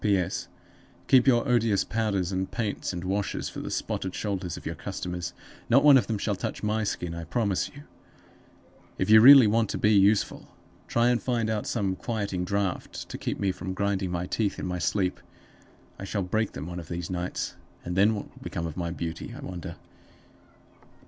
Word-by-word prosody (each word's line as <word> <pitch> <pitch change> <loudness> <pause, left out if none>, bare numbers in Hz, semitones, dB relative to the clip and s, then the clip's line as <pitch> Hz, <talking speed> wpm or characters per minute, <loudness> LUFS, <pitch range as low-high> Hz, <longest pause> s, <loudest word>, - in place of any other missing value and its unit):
"P.S. 100 -5 0 0.6
Keep 130 0 +5
your 120 0 +4
odious 115 -5 +3
powders 100 -5 -1
and 95 0 -2
paints 110 -4 -2
and 90 -1 -5
washes 100 +2 -2
for - - -7
the - - -5
spotted 95 -1 -3
shoulders 95 -5 -3
of - - -11
your - - -2
customers; 90 -1 -5 0.4
not 135 +4 +5
one 145 -2 +8
of 120 -7 +4
them 110 - -1
shall 105 0 -1
touch 95 - -5
my 110 +1 0
skin, 90 -4 -3
I 85 0 -5
promise 100 +3 0
you. 145 0 -13 1.1
If - - 0
you 110 0 +9
really 135 0 +10
want 110 +1 +2
to - - -2
be 105 - +3
useful, 100 +1 +3 0.4
try 120 +1 +2
and 120 -1 +2
find 115 -3 0
out 105 -1 -2
some 100 -5 -1
quieting 100 -5 -3
draught 100 -2 -3
to - - -5
keep - - -3
me 100 -1 +1
from 95 0 -6
grinding 100 -1 0
my 90 0 -2
teeth 100 +2 -1
in - - -4
my 90 -1 -3
sleep. 90 +2 0 0.8
I - - -6
shall 100 0 -2
break 110 +4 -1
them 70 - -6
one 90 +1 -6
of 85 - -9
these 85 +1 -4
nights; 90 0 -3 0.3
and 90 - -3
then 105 +3 +4
what 100 - -5
will - - -19
become 85 - -4
of 80 - -5
my 85 -2 -2
beauty, 85 -1 -5
I - - -9
wonder?" 90 -3 -6
100 Hz, 195 wpm, -27 LUFS, 90-110 Hz, 1.1 s, really